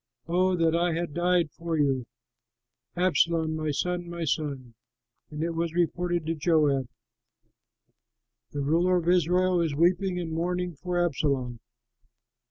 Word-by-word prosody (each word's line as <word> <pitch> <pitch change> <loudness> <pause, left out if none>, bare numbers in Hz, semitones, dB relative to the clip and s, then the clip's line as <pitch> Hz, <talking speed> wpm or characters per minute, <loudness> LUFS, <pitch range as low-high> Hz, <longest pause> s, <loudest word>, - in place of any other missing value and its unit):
Oh 180 +2 +2
that 165 -1 +2
I 170 0 +1
had 170 -2 -3
died 175 -1 +1
for 165 -1 -3
you, 135 -4 +1 0.9
Absalom, 170 -3 +2
my 155 -1 -2
son, 175 +4 -2
my 170 -1 -4
son!" 135 -3 -3 0.6
And 150 +1 -4
it 170 - -1
was 165 0 -2
reported 175 -1 0
to 165 - 0
Joab, 150 -5 +2 1.6
"The 145 - -3
ruler 170 +6 +2
of 170 -1 -3
Israel 180 +1 +3
is 160 -4 -1
weeping 180 +3 +2
and 170 -2 -4
mourning 180 +2 -2
for 180 +4 -3
Absalom." 130 -6 -1
170 Hz, 135 wpm, -27 LUFS, 150-175 Hz, 1.6 s, Israel